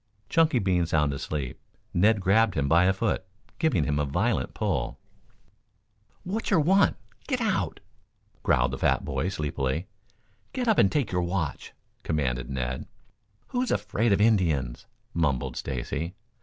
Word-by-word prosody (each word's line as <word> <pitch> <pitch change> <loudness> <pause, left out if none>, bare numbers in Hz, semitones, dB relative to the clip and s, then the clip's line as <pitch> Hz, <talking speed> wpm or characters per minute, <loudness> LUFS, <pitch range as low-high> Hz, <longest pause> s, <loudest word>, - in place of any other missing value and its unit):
Chunky 160 -4 +3
being 90 -5 +1
sound 75 -3 +2
asleep, 70 -2 -4 0.3
Ned 105 +3 +4
grabbed 100 +1 +3
him 70 -1 +1
by 85 +5 +5
a 95 - +5
foot 95 0 -1 0.4
giving 160 - +2
him 75 0 0
a - - +2
violent 95 - 0
pull. 95 - -1 1.3
"Wat'cher 195 -1 +1
want? 190 +6 +4 0.3
Get 255 -4 0
out!" 190 - -1 0.6
growled - - +2
the - - -5
fat - - +2
boy 90 - -1
sleepily. 75 -2 -2 0.7
"Get 255 -2 -2
up 220 - +4
and 95 - +5
take 140 -7 0
your 90 -1 +1
watch!" 85 -3 -3 0.3
commanded 65 -5 -1
Ned. 65 -1 -3 0.6
"Who's 250 0 -1
afraid 105 +2 +1
of 100 - +3
Indians?" 85 - +2 0.3
mumbled 75 -7 0
Stacy. 70 +6 -4
90 Hz, 140 wpm, -27 LUFS, 75-115 Hz, 1.3 s, by